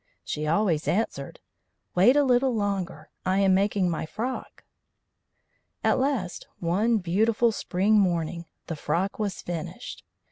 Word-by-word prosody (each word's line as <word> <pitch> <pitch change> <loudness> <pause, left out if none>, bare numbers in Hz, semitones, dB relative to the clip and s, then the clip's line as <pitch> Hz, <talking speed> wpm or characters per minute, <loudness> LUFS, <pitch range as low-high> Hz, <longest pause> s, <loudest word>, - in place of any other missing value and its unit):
She 150 0 -3
always 165 -2 +1
answered: 220 +5 -1 0.5
"Wait 195 +9 +5
a 290 - +5
little 255 -1 +3
longer. 200 -3 -3
I 185 +1 +1
am 195 -1 +4
making 195 -1 +2
my 165 -2 -2
frock." 245 +9 -5 1.2
At - - +3
last, 255 -10 -1
one 205 +7 +1
beautiful 220 +5 +2
spring 210 +1 +2
morning, 170 -3 0 0.2
the 165 - -4
frock 170 +8 -2
was 205 -3 -3
finished. 170 -3 -6
195 Hz, 130 wpm, -26 LUFS, 175-220 Hz, 1.2 s, Wait